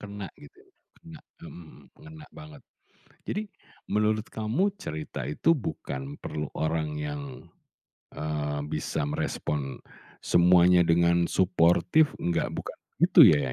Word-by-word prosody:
Kena 100 -1 -7
gitu 145 - -17
ya, 395 - -28 0.3
kena, 165 -2 -13 0.2
mhm 170 - -9
mhm. 85 - -14 0.2
Ngena 160 -1 -12
banget. 75 -1 -12 0.7
Jadi, 210 - -2 0.5
menurut 105 +1 +1
kamu 110 - -2 0.2
cerita 80 - -6
itu 75 - +1
bukan 70 - -6
perlu 75 -1 -4
orang 80 -1 -1
yang, 75 -1 -4 0.9
eee, 75 -1 -3
bisa - - -2
merespon 70 -1 -3 0.5
semuanya 90 0 +5
dengan 85 +1 +3
suportif, 95 - +3
nggak 85 - -1
bukan - - -6 0.2
itu - - +7
ya 70 -4 +1
85 Hz, 120 wpm, -27 LUFS, 75-110 Hz, 0.9 s, itu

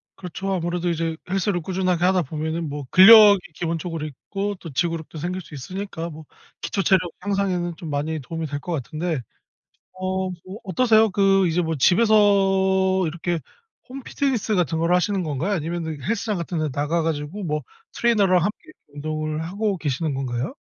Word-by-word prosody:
그렇죠. 190 +2 -5
아무래도 175 0 -1
이제 165 -1 -1
헬스를 190 -1 0
꾸준하게 180 0 -1
하다 185 0 +3
보면은 160 +3 -3
뭐 145 -1 -5
근력이 205 +1 +9 0.2
기본적으로 165 -1 -3
있고 195 +8 -4
또 165 - -9
지구력도 165 +2 -2
생길 180 +4 -3
수 150 - -15
있으니까 170 +4 -6
뭐 155 -1 -11 0.4
기초 195 - -2
체력 190 +2 +4 0.2
향상에는 185 -3 -1
좀 165 - -7
많이 150 +2 -2
도움이 160 +4 -5
될 145 0 -4
것 175 - -7
같은데. 155 +1 -3 0.8
어 185 0 -2
뭐 185 +3 -9
어떠세요? 220 +3 +4
그 195 -1 +3
이제 170 +1 +1
뭐 165 -1 -1
집에서 200 - +4 0.9
이렇게 170 +1 -2 0.5
홈 270 +2 -7
피트니스 245 -7 -1
같은 170 -3 0
거를 165 +2 +2
하시는 190 +1 0
건가요? 155 +5 -2
아니면은 160 -3 -3
헬스장 215 - -1
같은 170 0 -3
데 155 -1 -1
나가 150 +5 0
가지고 160 +5 -3
뭐 150 -3 -2 0.3
트레이너랑 205 -6 +3
함께 210 - -4 0.2
운동을 155 +1 -3
하고 200 +3 -1
계시는 150 -1 -2
건가요? 130 - -3
175 Hz, 375 characters per minute, -23 LUFS, 155-195 Hz, 0.9 s, 근력이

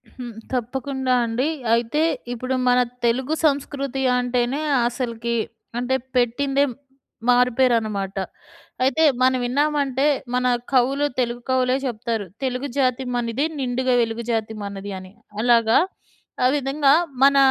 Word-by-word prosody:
హ్మ్. 245 -2 -7 0.2
తప్పకుండా 260 +2 -1
అండి. 235 +5 -1 0.3
అయితే 235 +6 0 0.3
ఇప్పుడు 255 +2 -2
మన 250 0 +4 0.3
తెలుగు 255 +5 +1
సంస్కృతి 275 -2 -1 0.2
అంటేనే 245 +3 0 0.3
అసలకి 235 -1 -3 0.4
అంటే 250 +2 0 0.2
పెట్టిందే 270 +3 +2 0.7
మారుపేరనమాట. 230 -5 +2 0.7
అయితే 280 +5 +2 0.2
మనం 255 0 +4
విన్నామంటే, 280 0 +1 0.3
మన 250 0 +1 0.3
కవులు 270 +2 +2
తెలుగు 240 -1 -1
కవులే 255 0 +2
చెప్తారు. 230 -3 -2 0.2
"తెలుగు 255 +1 -2
జాతి 260 -1 +1
మనది, 240 +4 -1
నిండుగ 255 0 -1
వెలుగు 230 0 -2
జాతి 220 -1 -1
మనది" 200 0 -6
అని. 185 0 -12 0.3
అలాగా 230 -1 +4 0.7
ఆ - - +5
విధంగా 275 0 +2 0.3
మన 280 0 +6
250 Hz, 115 wpm, -22 LUFS, 235-270 Hz, 0.7 s, మన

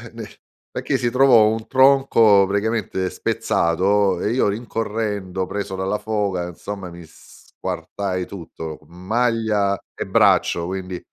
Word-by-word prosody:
n - - -6 0.5
perché 135 - -1
si 120 -1 -1
trovò 125 -3 +6
un 110 0 -3
tronco 130 -7 +5
praticamente 100 -2 -1
spezzato 95 +2 +1
e 105 - 0
io 125 -1 +2
rincorrendo, 105 -3 -3
preso 100 0 -4
dalla 95 +2 -2
foga, 105 -4 -2
insomma 95 +2 -7
mi 85 0 -11
squartai 90 +4 -6
tutto, 80 -4 -8
maglia 105 +2 0
e - - -5
braccio 85 - +3
quindi 95 0 -5
100 Hz, 120 wpm, -21 LUFS, 95-110 Hz, 0.5 s, trovò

